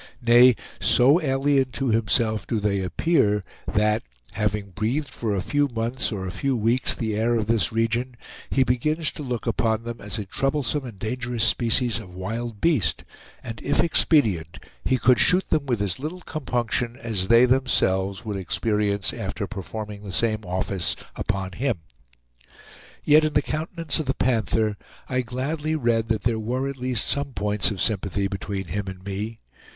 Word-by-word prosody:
Nay, 120 Hz, +1 st, +7 dB, 0.2 s
so 140 Hz, +8 st, +5 dB
alien 135 Hz, -1 st, +2 dB
to 135 Hz, -2 st, -1 dB
himself 110 Hz, -2 st, +1 dB
do 115 Hz, -, 0 dB
they 100 Hz, -1 st, 0 dB
appear 105 Hz, -, +1 dB, 0.3 s
that, 105 Hz, +1 st, +2 dB, 0.3 s
having 105 Hz, -2 st, -2 dB
breathed 120 Hz, -, -1 dB
for 110 Hz, -5 st, -2 dB
a 95 Hz, -, -1 dB
few 145 Hz, +5 st, +1 dB
months 120 Hz, +1 st, -2 dB
or 95 Hz, -3 st, -4 dB
a 90 Hz, -, -4 dB
few 130 Hz, +7 st, -1 dB
weeks 115 Hz, +4 st, +2 dB
the 110 Hz, -3 st, -2 dB
air 115 Hz, +2 st, +1 dB
of 110 Hz, -2 st, 0 dB
this 110 Hz, -5 st, +1 dB
region, 115 Hz, +2 st, -1 dB, 0.3 s
he 135 Hz, -, +3 dB
begins 150 Hz, +6 st, 0 dB
to -, -, -8 dB
look 125 Hz, -5 st, -4 dB
upon 110 Hz, -1 st, 0 dB
them 120 Hz, 0 st, -6 dB
as 105 Hz, +2 st, -4 dB
a 105 Hz, -, -4 dB
troublesome 135 Hz, +5 st, -1 dB
and 115 Hz, -5 st, -9 dB
dangerous 120 Hz, +2 st, -2 dB
species 115 Hz, +2 st, +2 dB
of 90 Hz, 0 st, -11 dB
wild 115 Hz, +3 st, -4 dB
beast, 105 Hz, -, +1 dB, 0.4 s
and, 115 Hz, -2 st, -7 dB
if 140 Hz, -, 0 dB
expedient, 110 Hz, -, +3 dB, 0.3 s
he 130 Hz, -, +2 dB
could 125 Hz, 0 st, +4 dB
shoot 185 Hz, +1 st, +5 dB
them 150 Hz, -3 st, +1 dB
with 120 Hz, -4 st, 0 dB
as 95 Hz, 0 st, -2 dB
little 160 Hz, +6 st, -5 dB
compunction 120 Hz, -6 st, -2 dB
as 110 Hz, -7 st, -2 dB
they 115 Hz, +3 st, +7 dB
themselves 100 Hz, -6 st, +1 dB
would 105 Hz, -2 st, -3 dB
experience 100 Hz, +1 st, 0 dB
after -, -, -4 dB
performing 105 Hz, +1 st, -6 dB
the 100 Hz, -2 st, -7 dB
same 110 Hz, +1 st, 0 dB
office 90 Hz, 0 st, -1 dB, 0.2 s
upon 95 Hz, -1 st, -2 dB
him. 120 Hz, +3 st, -1 dB, 1.3 s
Yet, 150 Hz, +1 st, +6 dB
in 155 Hz, -1 st, 0 dB
the -, -, +3 dB
countenance 160 Hz, 0 st, -2 dB
of 155 Hz, -, -3 dB
the 135 Hz, -, 0 dB
Panther, 110 Hz, -3 st, +1 dB, 0.3 s
I 130 Hz, 0 st, 0 dB
gladly 145 Hz, +6 st, -2 dB
read 115 Hz, -5 st, +1 dB
that 110 Hz, -2 st, -1 dB
there 115 Hz, -1 st, +1 dB
were 125 Hz, +5 st, -2 dB
at 140 Hz, -1 st, -5 dB
least 125 Hz, -3 st, -2 dB
some 140 Hz, -1 st, -1 dB
points 105 Hz, -1 st, +1 dB
of 100 Hz, -, -5 dB
sympathy 100 Hz, 0 st, 0 dB
between 95 Hz, 0 st, -4 dB
him 100 Hz, +3 st, -3 dB
and 95 Hz, -1 st, -7 dB
me. 105 Hz, +3 st, -4 dB
115 Hz, 170 wpm, -24 LUFS, 105-130 Hz, 1.3 s, Nay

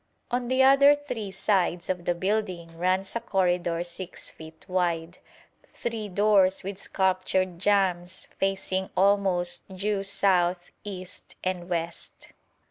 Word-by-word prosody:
On 245 Hz, 0 st, -1 dB
the 260 Hz, +1 st, +3 dB
other 275 Hz, +2 st, +7 dB
three 250 Hz, -8 st, -5 dB
sides 190 Hz, -2 st, 0 dB
of 180 Hz, -2 st, -3 dB
the 175 Hz, -, +1 dB
building 185 Hz, -3 st, -2 dB
runs 185 Hz, +4 st, 0 dB
a -, -, +1 dB
corridor 180 Hz, -5 st, 0 dB
6 175 Hz, +1 st, -6 dB
feet 160 Hz, 0 st, -13 dB
wide, 175 Hz, -2 st, -1 dB, 0.4 s
three 225 Hz, -3 st, -5 dB
doors 195 Hz, -1 st, +3 dB
with 195 Hz, 0 st, -5 dB
sculptured 185 Hz, -2 st, 0 dB
jambs 185 Hz, -3 st, +1 dB
facing 190 Hz, -1 st, -1 dB
almost 190 Hz, -2 st, +2 dB
due 200 Hz, +1 st, 0 dB
south, 185 Hz, -3 st, +1 dB
east, 185 Hz, -3 st, -9 dB
and 185 Hz, -1 st, -3 dB
west. 170 Hz, -1 st, -5 dB
185 Hz, 125 wpm, -27 LUFS, 175-200 Hz, 0.4 s, other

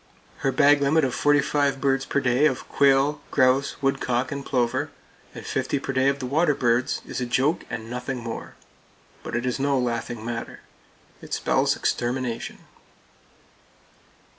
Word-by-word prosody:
Her 135 Hz, -, 0 dB
bag 145 Hz, +2 st, +4 dB
limit 150 Hz, +3 st, +3 dB
of 130 Hz, -2 st, 0 dB
forty 145 Hz, +4 st, +3 dB
five 140 Hz, -1 st, 0 dB
birds 135 Hz, -1 st, +1 dB
per -, -, 0 dB
day 130 Hz, +2 st, +3 dB
of -, -, -3 dB
quail, 140 Hz, +2 st, +3 dB
grouse, 130 Hz, +1 st, +2 dB
woodcock 135 Hz, -2 st, 0 dB
and 140 Hz, -1 st, -4 dB
plover, 120 Hz, -3 st, 0 dB, 0.5 s
and -, -, -8 dB
fifty -, -, -1 dB
per 135 Hz, -, -4 dB
day 130 Hz, +1 st, +3 dB
of 140 Hz, -, 0 dB
the 135 Hz, -, -5 dB
waterbirds, 130 Hz, -4 st, +1 dB
is -, -, -5 dB
a 125 Hz, -, -2 dB
joke, 135 Hz, +7 st, +1 dB
and 115 Hz, -1 st, -5 dB
nothing 125 Hz, +2 st, -4 dB
more; 115 Hz, -1 st, -7 dB, 0.7 s
but -, -, -6 dB
it 120 Hz, +1 st, -1 dB
is 125 Hz, +1 st, -1 dB
no 140 Hz, 0 st, +1 dB
laughing 120 Hz, -2 st, -2 dB
matter. 115 Hz, 0 st, -5 dB, 0.6 s
It -, -, -4 dB
spells -, -, +1 dB
extermination. 120 Hz, -1 st, -2 dB
135 Hz, 155 wpm, -24 LUFS, 120-140 Hz, 0.7 s, bag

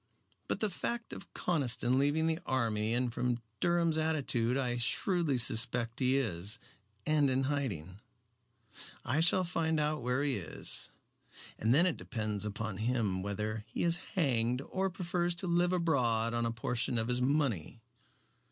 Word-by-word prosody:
But -, -, -2 dB
the 215 Hz, -, +2 dB
fact 235 Hz, +5 st, -3 dB
of -, -, -9 dB
Conniston 130 Hz, -6 st, +1 dB
leaving 145 Hz, +3 st, +2 dB
the 165 Hz, 0 st, +1 dB
army 115 Hz, -5 st, 0 dB
and 125 Hz, -1 st, 0 dB
from 120 Hz, 0 st, 0 dB, 0.2 s
Durham's 170 Hz, -2 st, +2 dB
attitude 135 Hz, -6 st, +1 dB
I 125 Hz, -3 st, 0 dB
shrewdly 160 Hz, +4 st, +1 dB
suspect 115 Hz, 0 st, +1 dB
he 130 Hz, +1 st, +3 dB
is, 105 Hz, -4 st, -2 dB, 0.5 s
and 150 Hz, -2 st, +3 dB
in 130 Hz, +1 st, +1 dB
hiding. 105 Hz, -, -2 dB, 1.1 s
I 140 Hz, +6 st, +1 dB
shall 175 Hz, +3 st, +4 dB
find 160 Hz, -3 st, 0 dB
out 150 Hz, 0 st, 0 dB
where 125 Hz, +3 st, 0 dB
he 140 Hz, -5 st, +1 dB
is, 90 Hz, -5 st, -4 dB, 0.7 s
and 110 Hz, -, +2 dB
then 160 Hz, +8 st, +5 dB
it 180 Hz, -, +1 dB
depends 110 Hz, -4 st, -3 dB
upon 105 Hz, -1 st, -4 dB
him 110 Hz, -4 st, 0 dB
whether 105 Hz, +2 st, -3 dB
he 115 Hz, -, -3 dB
is 170 Hz, 0 st, +4 dB, 0.2 s
hanged 125 Hz, -7 st, +1 dB
or 190 Hz, +6 st, -1 dB
prefers 175 Hz, -1 st, -1 dB
to 170 Hz, -, -4 dB
live 175 Hz, 0 st, +2 dB
abroad 125 Hz, -10 st, +1 dB
on 120 Hz, 0 st, 0 dB
a -, -, -1 dB
portion 120 Hz, +1 st, -1 dB
of 110 Hz, 0 st, 0 dB
his 125 Hz, 0 st, +1 dB
money." 125 Hz, -, 0 dB
125 Hz, 155 wpm, -32 LUFS, 115-160 Hz, 1.1 s, then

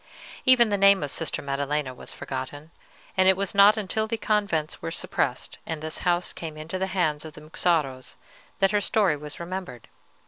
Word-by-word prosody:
"Even 250 Hz, -3 st, +6 dB
the 205 Hz, -1 st, 0 dB
name 200 Hz, -3 st, +6 dB
of 145 Hz, -, -2 dB
Sister 165 Hz, -, -2 dB
Maddelena 140 Hz, 0 st, -2 dB
was -, -, -7 dB
forgotten, 145 Hz, +4 st, -6 dB, 0.4 s
and 185 Hz, 0 st, +4 dB
it 190 Hz, -, +4 dB
was 200 Hz, 0 st, -1 dB
not 200 Hz, +2 st, +7 dB
until 215 Hz, +1 st, -1 dB
the 230 Hz, +1 st, -2 dB
convents 200 Hz, -8 st, 0 dB
were 80 Hz, -, -3 dB
suppressed, -, -, -2 dB
and 160 Hz, -1 st, -4 dB
this 155 Hz, +1 st, -5 dB
house 175 Hz, 0 st, 0 dB
came 160 Hz, -2 st, -7 dB
into 160 Hz, +4 st, -5 dB
the 190 Hz, -, 0 dB
hands 160 Hz, -6 st, 0 dB
of 155 Hz, -1 st, -9 dB
the 150 Hz, -, -12 dB
Muxaros, 155 Hz, -4 st, -1 dB, 0.4 s
that 195 Hz, -1 st, +3 dB
her 210 Hz, -1 st, +2 dB
story 200 Hz, -5 st, +2 dB
was 150 Hz, 0 st, -8 dB
remembered. 170 Hz, -, -6 dB
165 Hz, 185 wpm, -26 LUFS, 150-200 Hz, 0.4 s, not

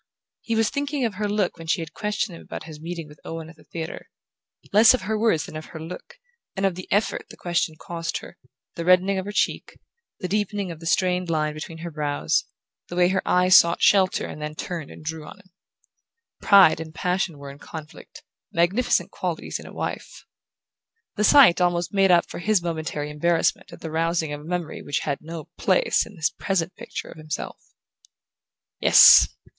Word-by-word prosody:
He 230 Hz, -, -2 dB
was 225 Hz, 0 st, +2 dB
thinking 285 Hz, -2 st, -2 dB
of 225 Hz, -, -2 dB
her 205 Hz, +1 st, -3 dB
look 200 Hz, -4 st, -1 dB
when 165 Hz, -, -9 dB
she 170 Hz, -, +1 dB
had 160 Hz, -1 st, -7 dB
questioned 210 Hz, -2 st, -2 dB
him -, -, -12 dB
about -, -, -8 dB
his 155 Hz, -1 st, -11 dB
meeting 165 Hz, -1 st, -6 dB
with 150 Hz, 0 st, -16 dB
Owen 165 Hz, 0 st, -7 dB
at -, -, -18 dB
the -, -, -20 dB
theatre: 165 Hz, -1 st, -7 dB, 0.6 s
less 220 Hz, +4 st, +7 dB
of -, -, -6 dB
her 220 Hz, +3 st, -1 dB
words 215 Hz, -8 st, +1 dB
than -, -, -11 dB
of 155 Hz, 0 st, -6 dB
her 160 Hz, -, -10 dB
look, 180 Hz, -, -9 dB, 0.4 s
and 195 Hz, 0 st, -1 dB
of 195 Hz, -, +2 dB
the 185 Hz, +1 st, -10 dB
effort 205 Hz, +2 st, 0 dB
the -, -, -13 dB
question 175 Hz, -2 st, -1 dB
cost 165 Hz, -1 st, -4 dB
her: -, -, -11 dB, 0.4 s
the 170 Hz, -, -5 dB
reddening 185 Hz, +2 st, +3 dB
of 190 Hz, -, -5 dB
her 205 Hz, -, -5 dB
cheek, 210 Hz, -, -1 dB, 0.4 s
the 185 Hz, -, -3 dB
deepening 205 Hz, -1 st, -2 dB
of 165 Hz, -, -9 dB
the 165 Hz, -, -7 dB
strained 180 Hz, +1 st, +1 dB
line 155 Hz, -2 st, 0 dB
between 155 Hz, +2 st, -8 dB
her 170 Hz, +1 st, -7 dB
brows, 145 Hz, -, -1 dB, 0.4 s
the 175 Hz, -, -7 dB
way 180 Hz, 0 st, +4 dB
her 190 Hz, 0 st, 0 dB
eyes 180 Hz, 0 st, +4 dB
sought 170 Hz, -1 st, +5 dB
shelter 190 Hz, -1 st, +4 dB
and 150 Hz, -, -8 dB
then 150 Hz, 0 st, -5 dB
turned 170 Hz, -4 st, -5 dB
and -, -, -12 dB
drew 160 Hz, 0 st, -4 dB
on 150 Hz, -, -11 dB
him. 190 Hz, -2 st, -22 dB, 0.9 s
Pride 195 Hz, -6 st, +6 dB
and 160 Hz, -1 st, -8 dB
passion 180 Hz, -2 st, -1 dB
were 140 Hz, -1 st, -9 dB
in 140 Hz, -, -14 dB
the -, -, -17 dB
conflict 155 Hz, -1 st, -11 dB, 0.3 s
magnificent 185 Hz, +9 st, +1 dB
qualities -, -, -4 dB
in -, -, -11 dB
a -, -, -11 dB
wife! -, -, -6 dB, 0.9 s
The 210 Hz, -, 0 dB
sight 240 Hz, -8 st, +7 dB
almost 175 Hz, 0 st, 0 dB
made 195 Hz, -1 st, +3 dB
up 175 Hz, -1 st, +4 dB
for -, -, -8 dB
his 205 Hz, 0 st, +1 dB
momentary 160 Hz, -3 st, -3 dB
embarrassment 165 Hz, +3 st, 0 dB
at -, -, -12 dB
the 160 Hz, -, -6 dB
rousing 165 Hz, -1 st, 0 dB
of 145 Hz, -, -6 dB
a -, -, -13 dB
memory 175 Hz, -1 st, -4 dB
which 145 Hz, -, -2 dB
had 140 Hz, -2 st, -2 dB
no 160 Hz, 0 st, -8 dB
place -, -, +2 dB
in 215 Hz, -, -14 dB
his 160 Hz, -2 st, 0 dB
present 185 Hz, -3 st, -2 dB
picture -, -, -7 dB
of -, -, -12 dB
himself. 155 Hz, 0 st, -6 dB, 1.2 s
Yes! -, -, +8 dB
175 Hz, 205 wpm, -24 LUFS, 160-195 Hz, 1.2 s, Yes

